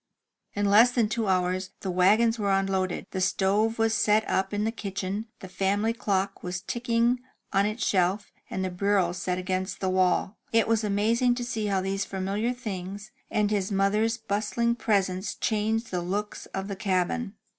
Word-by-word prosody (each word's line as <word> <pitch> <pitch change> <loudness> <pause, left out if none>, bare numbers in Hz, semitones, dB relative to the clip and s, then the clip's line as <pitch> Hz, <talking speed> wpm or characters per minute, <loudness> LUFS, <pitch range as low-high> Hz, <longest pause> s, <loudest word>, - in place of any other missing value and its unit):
In 205 0 0
less 210 +5 +7
than 235 -4 +1
two 220 -1 -1
hours 185 0 0
the 190 - -2
wagons 215 +6 +4
were 200 -1 +1
unloaded, 195 -1 0
the 190 - -2
stove 205 +4 +2
was 225 0 +2
set 220 -1 +3
up 190 0 0
in 205 0 -1
the 220 - 0
kitchen, 200 0 -4
the 190 - -7
family 200 +4 0
clock 195 -4 -1
was 180 0 -4
ticking 240 +1 +1 0.3
on 200 +1 +3
its 215 +3 -2
shelf, 190 +2 +1 0.2
and 190 - -2
the 185 - -3
bureau 190 -1 +1
set 180 0 -2
against 185 +1 -2
the 190 -1 0
wall. 185 +1 +1
It 225 0 +3
was 225 -1 +2
amazing 225 +4 +2
to 245 - -3
see 220 -3 -2
how 195 -2 +1
these 195 +1 -1
familiar 195 +5 -2
things 200 -4 -6 0.2
and 210 0 +1
the 200 -2 0
mother's 210 +4 +2
bustling 225 +2 0
presence 195 -5 0
changed 220 +1 -1
the 180 -1 -1
looks 200 +4 -4
of 195 0 -5
the 200 - -4
cabin. 195 +3 -1
200 Hz, 175 wpm, -27 LUFS, 190-225 Hz, 0.3 s, less